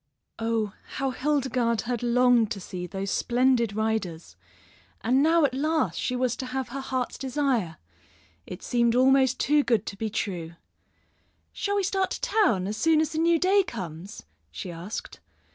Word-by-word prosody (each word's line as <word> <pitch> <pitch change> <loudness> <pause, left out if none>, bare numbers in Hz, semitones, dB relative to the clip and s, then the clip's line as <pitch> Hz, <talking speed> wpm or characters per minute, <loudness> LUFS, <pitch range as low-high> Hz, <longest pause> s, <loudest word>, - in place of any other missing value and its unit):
Oh, 225 -2 -1 0.2
how 270 -1 -1
Hildegarde 255 -5 0
had 240 0 -2
longed 245 -2 +3
to 200 - -8
see 180 -1 -6
those 195 +2 -4
splendid 240 -3 +2
riders! 210 - -2 0.7
And 255 +5 +2
now 325 +1 +4
at 265 - 0
last 310 +4 0
she 250 - -1
was 250 -1 0
to 260 - -5
have 255 -1 -3
her 270 +3 -5
heart's 260 -2 -3
desire. 260 - -1 0.7
It 180 - -8
seemed 235 -1 +2
almost 260 0 +4
too 295 +1 +3
good 230 -5 +1
to - - -5
be 220 +2 -3
true. 180 -6 -4 1.0
"Shall 405 0 -2
we 400 - +1
start 385 0 0
to - - -5
town 415 - +2
as 210 +2 -3
soon 320 +6 +3
as 315 - 0
the 315 - -2
new 335 +1 +4
day 380 +4 +4
comes?" 190 - -7 0.3
she 175 - -7
asked. 170 +6 -7
245 Hz, 165 wpm, -26 LUFS, 210-275 Hz, 1.0 s, now